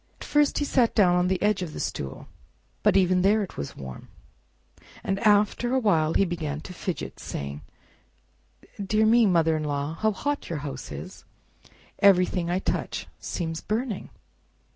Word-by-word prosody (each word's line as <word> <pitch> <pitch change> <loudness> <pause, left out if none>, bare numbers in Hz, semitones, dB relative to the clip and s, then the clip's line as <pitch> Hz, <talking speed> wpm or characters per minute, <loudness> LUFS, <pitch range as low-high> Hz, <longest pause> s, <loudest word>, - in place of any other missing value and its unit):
At - - -8
first 295 -1 +2
he 290 - +1
sat 245 -4 +2
down 180 -5 +5
on 180 0 +2
the 185 0 0
edge 210 -2 +2
of 165 -4 -5
the - - -6
stool, 65 -1 -5 0.5
but - - +4
even 185 -1 +3
there 205 +3 +3
it 190 - -8
was 70 - -6
warm, 65 -2 -9 1.0
and 195 0 -1
after 210 +4 +3
a - - +4
while 165 -9 +2
he 195 - +4
began 155 -4 -3
to 180 - -9
fidget, 180 0 -5
saying, 70 +1 -5 1.2
"Dear 215 +2 +2
me, 230 0 +5
mother 165 -3 +3
in 155 - -2
law, 145 +1 -2
how 215 +6 +1
hot 285 +8 -3
your 165 - -2
house 140 - -6
is! 70 +1 -8 0.8
Everything 180 -3 +4
I 175 - +1
touch 190 - -2
seems 165 -2 -4
burning!" 220 -1 -3
185 Hz, 165 wpm, -26 LUFS, 160-215 Hz, 1.2 s, down